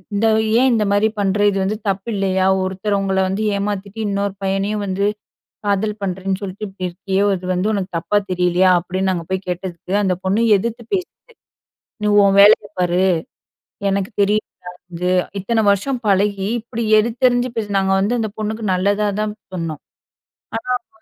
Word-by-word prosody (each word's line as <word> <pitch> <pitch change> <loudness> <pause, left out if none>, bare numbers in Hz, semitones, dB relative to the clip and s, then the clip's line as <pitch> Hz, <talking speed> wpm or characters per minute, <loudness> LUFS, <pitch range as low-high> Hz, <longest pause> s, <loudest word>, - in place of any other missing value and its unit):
"இந்த 215 - +1 0.3
ஏன் 260 - +4
இந்த 215 -2 +2
மாதிரி 205 +2 +3
பண்ற? 200 0 +1
இது 195 - -2
வந்து 210 +2 -1
தப்பில்லையா? 195 -1 0 0.2
ஒருத்தரவங்கள 195 0 -1
வந்து 195 +3 -2 0.2
ஏமாத்திட்டு 200 +1 -4
இன்னொரு 200 -1 -1
பையனையும் 200 +2 -1
வந்து 195 +2 0 0.6
காதல் 210 +1 0
பண்றேன்னு 190 0 -2
சொல்ட்டு, 195 +2 -5
இப்படி 190 -1 -8
இருக்கியே. 190 +2 -1
இது 180 0 -8
வந்து 190 +4 0
உனக்கு 190 -1 -3
தப்பா 205 +5 +1
தெரியலையா?" 180 +1 +3
அப்படீன்னு 185 +2 -1
நாங்க 170 -2 -3
போய் 190 0 -2
கேட்டதுக்கு, 180 0 -4
அந்தப் 185 -1 -1
பொண்ணு 200 +5 +1 0.2
எதிர்த்து 235 +2 -4
பேசுது, 365 -2 -2 0.9
"நீ 210 - +2
உன் 195 0 +4
வேலையை 210 +1 +6
பாரு, 180 +1 +2 0.9
எனக்கு 195 +3 -1
தெரியும் 210 +2 +1 0.2
அது." 180 0 -5 0.3
இத்தன 220 +2 0
வருஷம் 245 +6 0
பழகி 200 0 +2
இப்படி 235 0 -5 0.2
எடுத்தெறிஞ்சு 245 +2 +1
பேசுனா. 205 -3 -2
நாங்க 195 0 +1
வந்து 215 +5 +1
அந்தப் 215 -1 -4
பொண்ணுக்கு 215 +1 -3
நல்லதா 205 +3 +1
தான் 210 0 -2 0.2
சொன்னோம். 165 -4 -4
ஆனா - - -81 1.0
அவங்க 220 - -28
200 Hz, 155 wpm, -19 LUFS, 190-210 Hz, 1.0 s, வேலையை